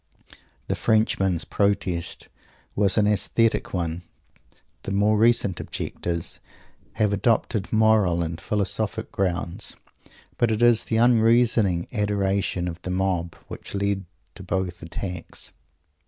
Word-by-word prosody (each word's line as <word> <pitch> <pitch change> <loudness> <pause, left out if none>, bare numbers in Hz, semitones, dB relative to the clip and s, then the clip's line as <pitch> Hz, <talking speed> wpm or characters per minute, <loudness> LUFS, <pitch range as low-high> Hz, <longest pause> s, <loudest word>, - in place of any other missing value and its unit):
The - - 0
Frenchman's 95 -6 +1
protest 95 -4 -1 0.5
was 100 +1 +3
an 105 - +4
aesthetic 105 +2 +1
one. 85 -2 -2 0.8
The - - -6
more 105 +2 +3
recent 110 -4 +3
objectors 85 -1 -4 0.5
have 105 -1 +1
adopted 110 0 0
moral 110 -6 +3
and 85 0 -5
philosophic 105 +1 -2
grounds. 90 -3 -2 0.6
But 120 - +3
it 110 +1 +1
is 120 -2 +5
the 110 - 0
unreasoning 115 -5 +3
adoration 100 -4 0
of 85 0 -6
the 90 - -6
mob 90 -2 -1
which - - -8
led 100 -1 -1 0.3
to - - -12
both 90 -1 -3
attacks. 90 +1 -5
100 Hz, 115 wpm, -24 LUFS, 90-110 Hz, 0.8 s, is